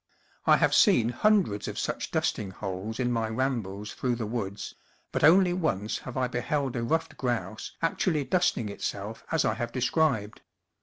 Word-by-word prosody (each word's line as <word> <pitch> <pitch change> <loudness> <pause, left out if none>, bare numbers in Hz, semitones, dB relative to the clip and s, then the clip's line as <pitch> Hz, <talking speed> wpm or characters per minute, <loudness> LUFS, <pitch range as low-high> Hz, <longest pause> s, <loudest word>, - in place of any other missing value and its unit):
I - - +7
have - - +2
seen 115 -1 +5
hundreds 180 - +2
of - - -5
such - - -2
dusting 100 - -1
holes 95 +3 -5
in 125 -1 +1
my 115 -2 0
rambles 110 -5 -2
through 125 -2 -1
the 115 -2 -3
woods, 105 -3 -4 0.4
but - - -1
only 180 +3 +6
once 110 - -1
have 130 0 -7
I 130 -1 +1
beheld 130 +2 -1
a 120 - -1
ruffed 160 +8 -1
grouse 120 -3 -3
actually 165 -2 +1
dusting 175 - +1
itself 100 +1 -5
as 165 -2 +2
I 110 - +2
have 120 +1 -4
described. 125 -4 0
120 Hz, 165 wpm, -28 LUFS, 110-145 Hz, 0.4 s, I